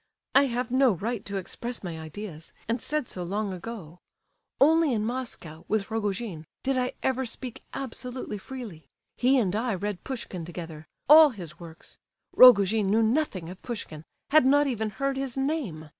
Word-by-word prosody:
I 275 - +6
have 245 0 -2
no 260 -2 +4
right 215 +4 -3
to 200 -1 -4
express 235 +6 -5
my 170 -3 -5
ideas, 160 0 -8
and 230 +1 -1
said 300 -4 -1
so 180 - -6
long 200 +3 -2
ago. 180 -3 -8 0.6
Only 315 0 +5
in 215 -2 0
Moscow, 225 -10 -5
with 215 -1 -1
Rogojin, 205 -6 -3 0.2
did 270 0 +1
I 255 0 0
ever 265 0 +1
speak 250 0 -6
absolutely 250 -4 -5
freely! 210 - -9 0.3
He 260 +2 +4
and 205 -6 +1
I 225 -1 0
read 200 0 -4
Pushkin 225 -9 -5
together—all 175 - +4
his 175 - -8
works. 165 -2 -12 0.4
Rogojin 210 -4 +7
knew 220 +3 +3
nothing 220 - 0
of 180 +2 -10
Pushkin, 180 -10 -6 0.3
had 310 -1 +7
not 285 +3 +4
even 220 -5 -1
heard 275 +5 -2
his 270 -2 -3
name. 270 - -2
220 Hz, 160 wpm, -27 LUFS, 185-260 Hz, 0.6 s, Rogojin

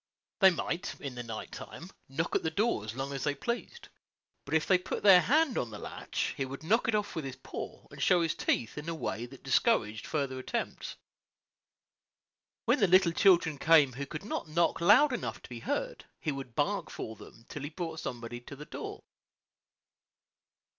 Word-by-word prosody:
They 195 -2 +9
might, 170 -1 -3
in 140 -3 -5
the 125 - -5
night 115 -2 -6
time, 175 +4 -9 0.2
knock 160 +5 -2
at - - +3
the 160 - 0
door 195 - +1
as 110 +2 -6
long 135 +1 -3
as 135 -2 -3
they 145 -1 0
pleased; 245 - -4 0.6
but - - -1
if 160 - +3
they 185 -2 +4
put - - -4
their 190 -3 +9
hand 290 - +3
on 120 - -2
the 105 - -8
latch, - - -3
he - - -1
would 135 +2 -7
knock 225 +9 +2
it 225 - +2
off 205 -2 -1
with 160 - -2
his 135 -2 -5
paw, - - -8
and - - -9
show 175 -2 +4
his 165 - +1
teeth 115 +5 -1
in 155 +3 -6
a 165 - -2
way 120 -6 -3
that 135 +2 -14
discouraged 130 - +2
further 140 -4 -2
attempts. 235 - -4 1.7
When - - +3
the 200 - +5
little 185 -1 +5
children 170 -5 +4
came 150 -5 +5
who 140 +3 -5
could 170 +4 -7
not 210 - -3
knock 170 +1 +1
loud 250 +11 +6
enough - - -3
to - - -11
be - - -6
heard, - - -3
he 155 - -1
would 135 -4 -7
bark - - 0
for 110 - -6
them 115 +2 -14
till 145 - -7
he 145 - -4
brought 165 -1 -5
somebody 120 -2 -5
to 140 - -10
the 150 +2 -9
door. - - -7
160 Hz, 200 wpm, -31 LUFS, 135-185 Hz, 1.7 s, They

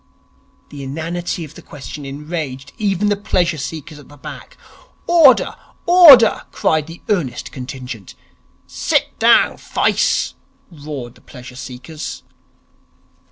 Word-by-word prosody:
The 145 - -9
inanity 165 +5 -4
of 150 - -14
the - - -12
question 145 -1 -9
enraged 145 -1 -6
even 205 -1 +1
the 205 - +2
pleasure 175 -5 0
seekers 155 +1 -7
at 145 - -16
the 145 - -15
back. - - -10 0.5
'Order! 325 -7 +5 0.3
Order!' 315 -11 +8
cried 155 -1 0
the 165 +1 -12
earnest 170 - -2
contingent. 125 -5 -8 0.5
'Sit - - -1
down, - - +4
fice!' 65 - 0 0.4
roared 145 -6 -8
the - - -22
pleasure 125 -1 -12
seekers. 130 +4 -8
150 Hz, 115 wpm, -18 LUFS, 135-175 Hz, 0.5 s, Order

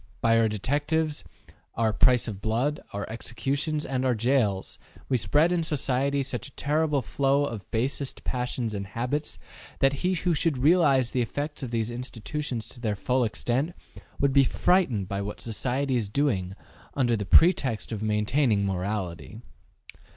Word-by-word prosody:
By 115 0 +4
our 115 - +4
detectives, 145 - -1 0.5
our 110 -1 +1
`price 125 +2 +4
of 100 -3 -6
blood,' 120 +8 0
our 100 0 -4
executions, 140 +7 -2
and 130 -1 -1
our 130 -2 +2
jails, 110 -4 0 0.3
we 135 - +2
spread 145 - +3
in 175 -1 +1
society 140 -2 0
such 130 0 -5
a - - -14
terrible 150 -1 +1
flow 140 +3 +1
of 115 -7 -6
basest 130 +4 -3
passions 125 -2 -2
and 100 -1 -4
habits, 125 +8 -3 0.4
that 135 0 +3
he 185 +1 +1
who 175 0 +1
should 155 -2 +1
realize 140 -3 +4
the 125 - +1
effects 145 +6 -3
of 130 - -4
these 115 0 -1
institutions 125 +1 -5
to 125 - -13
their 110 -4 -1
full 125 +5 +1
extent, 125 +8 -1 0.4
would 140 -1 +2
be 140 0 +6
frightened 130 - +2
by 100 +1 -3
what 100 +1 -5
society 130 +4 -1
is 110 -5 -1
doing 100 -8 0 0.4
under 120 -4 +2
the 105 - -2
pretext 130 - +3
of 110 -2 -3
maintaining 105 +1 +1
morality. 95 +1 -3
125 Hz, 160 wpm, -27 LUFS, 110-145 Hz, 0.5 s, be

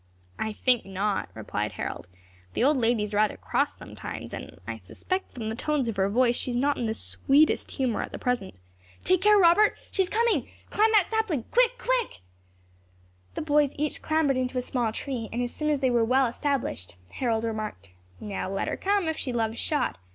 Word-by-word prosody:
"I 220 - -1
think 245 +3 +2
not," 195 +1 -2
replied - - -3
Harold, - - -5 0.5
"the - - +1
old 285 +2 +4
lady 230 -3 +2
is 210 0 -5
rather 210 +1 +2
cross - - -1
sometimes, - - -8
and - - -8
I - - -5
suspect 375 0 -4
from 230 -3 -6
the - - -2
tones 290 0 0
of 225 - -2
her 195 0 +2
voice 240 +3 +3
she - - -3
is 240 - -1
not 285 +3 +2
in 235 - -2
the 220 - -1
sweetest 290 +7 +3
humour 255 -5 -1
at - - -5
the - - -5
present. 245 -6 -2 0.5
Take 370 0 +3
care, 420 +1 +6
Robert, 380 +3 +5
she 390 - +1
is 370 - 0
coming! 435 - +1 0.2
Climb 435 +1 +3
that 415 -4 +6
sapling! 440 - -1
Quick! - - +3
Quick!" - - -1 1.1
The - - -3
boys 295 -2 +2
each 300 0 -2
clambered 310 -4 +1
into 255 0 -1
a 250 - 0
small 240 -3 -1
tree, 235 -1 -4
and 235 - -3
as 245 - -3
soon 305 0 -1
as 290 -2 +1
they 260 -2 +3
were 235 -1 +3
well 260 +4 +3
established, 245 - -2 0.2
Harold 230 -3 -1
remarked, 215 - -4 0.3
"Now 200 -2 -4
let 195 - -2
her - - -3
come, 395 -3 +1
if 320 0 -1
she 255 - -3
loves 225 -1 -1
shot. 300 - 0
255 Hz, 205 wpm, -27 LUFS, 225-320 Hz, 1.1 s, care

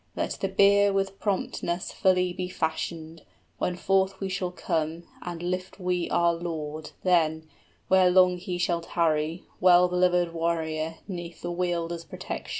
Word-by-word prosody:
Let - - -2
the 195 - +1
bier 200 +1 +5
with 195 0 -1
promptness 185 -3 -2
Fully 180 -1 +2
be 180 0 -4
fashioned, 160 -1 -3 0.4
when 180 - 0
forth 190 +1 +1
we 195 - -3
shall 185 -1 -2
come, 165 -2 -2 0.2
And 175 -1 -6
lift 185 +2 -3
we 180 -1 -1
our 170 0 +3
lord, 155 -2 -5
then, 160 -3 +2 0.4
where 185 -1 +5
long 180 0 +5
he 180 0 -4
shall 175 -1 0
tarry, 165 -1 0
50 - - -33
Well 180 0 +6
beloved 180 -1 +2
warrior, 165 -1 -1
'neath 175 -3 -7
the 175 - -2
Wielder's 170 -1 -2
protection." - - -6
175 Hz, 150 wpm, -27 LUFS, 165-185 Hz, 0.4 s, Well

